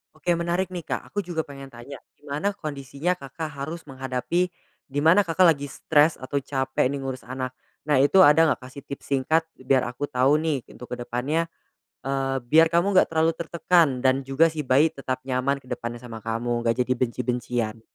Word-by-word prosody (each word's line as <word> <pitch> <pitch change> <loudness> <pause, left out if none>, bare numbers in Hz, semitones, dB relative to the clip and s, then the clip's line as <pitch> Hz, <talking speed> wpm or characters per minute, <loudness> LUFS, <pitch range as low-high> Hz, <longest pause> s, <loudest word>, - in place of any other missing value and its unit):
Oke 170 +3 0
menarik 170 +2 -1
nih 175 - -4
Kak - - -4
aku 205 0 -3
juga 170 -2 -4
pengen 135 -1 -10
tanya 120 +4 -10 0.2
gimana 150 +7 -2
kondisinya 150 -1 -3
Kakak 160 0 -6 0.2
harus 160 +2 -7
menghadapi, 135 +7 -1 0.4
dimana 160 +8 +4
Kakak 170 -1 +4
lagi 140 -1 -7
stres 150 +2 +2
atau 130 +2 -7
capek 130 -1 0
nih 140 - -3
ngurus 130 -1 -5
anak, 130 0 -5 0.3
nah 150 - +3
itu 140 +8 +5
ada 160 -2 +7
nggak 155 - +2
Kak 125 - -11
sih 140 - -9
tips 140 - -9
singkat 155 +4 +1
biar 130 -1 +1
aku 125 +3 -6
tau 130 +3 +4
nih 155 -4 -1
untuk 125 - -11
kedepannya, 125 +7 -2 0.6
eee, 135 0 -1
biar 160 +6 +5
kamu 170 +4 +2
nggak 185 - +5
terlalu 160 0 +2
tertekan 165 -5 +2
dan 130 +1 +4
juga 135 +5 +2
si 155 - -4
bayi 145 +3 +3
tetap 130 -3 -4
nyaman 130 +1 0
kedepannya 120 -1 -5
sama 115 -2 -9
kamu 115 +2 -2
nggak 115 -1 +1
jadi 130 - 0
benci-bencian. 120 -2 -2
140 Hz, 180 wpm, -25 LUFS, 130-160 Hz, 0.6 s, ada